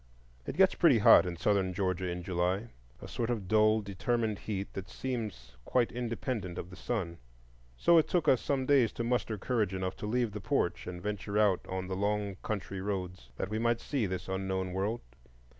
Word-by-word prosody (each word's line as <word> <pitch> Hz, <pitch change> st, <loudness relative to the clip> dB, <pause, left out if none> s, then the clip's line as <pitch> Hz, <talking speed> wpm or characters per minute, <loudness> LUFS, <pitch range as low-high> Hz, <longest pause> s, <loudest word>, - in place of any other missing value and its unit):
It -, -, -4 dB
gets 190 Hz, 0 st, +6 dB
pretty 160 Hz, -9 st, +5 dB
hot 105 Hz, -3 st, +7 dB
in 85 Hz, -1 st, -4 dB
Southern 95 Hz, 0 st, +1 dB
Georgia 95 Hz, -1 st, -1 dB
in 90 Hz, 0 st, -4 dB
July,—a 90 Hz, -, -3 dB
sort 115 Hz, -1 st, -3 dB
of 110 Hz, -6 st, -2 dB
dull, 110 Hz, +1 st, +4 dB
determined 110 Hz, +2 st, -1 dB
heat 100 Hz, -2 st, -4 dB
that 95 Hz, -1 st, -6 dB
seems 105 Hz, -, -5 dB
quite 120 Hz, -, +1 dB
independent 115 Hz, -5 st, -3 dB
of 90 Hz, -, -6 dB
the -, -, -9 dB
sun; 95 Hz, -5 st, -3 dB, 0.6 s
so 170 Hz, -, +6 dB
it 155 Hz, -, +1 dB
took 175 Hz, -3 st, 0 dB
us 130 Hz, -, +5 dB
some 135 Hz, -2 st, 0 dB
days 130 Hz, -4 st, +4 dB
to 115 Hz, -, -3 dB
muster 115 Hz, -2 st, 0 dB
courage 105 Hz, -2 st, 0 dB
enough 95 Hz, 0 st, -2 dB
to 105 Hz, -, -5 dB
leave 120 Hz, 0 st, 0 dB
the 105 Hz, 0 st, -6 dB
porch -, -, -1 dB
and 90 Hz, -1 st, -6 dB
venture 105 Hz, 0 st, -3 dB
out 105 Hz, -4 st, +3 dB
on 95 Hz, 0 st, -3 dB
the 95 Hz, 0 st, -3 dB
long 100 Hz, 0 st, -1 dB
country 100 Hz, -2 st, -4 dB
roads, 95 Hz, -2 st, -4 dB
that 95 Hz, -, -3 dB
we 110 Hz, +1 st, -2 dB
might 115 Hz, 0 st, +1 dB
see 130 Hz, -6 st, -1 dB
this 90 Hz, -1 st, -4 dB
unknown 95 Hz, -1 st, -2 dB
world. 100 Hz, +5 st, -1 dB
100 Hz, 190 wpm, -31 LUFS, 95-115 Hz, 0.6 s, hot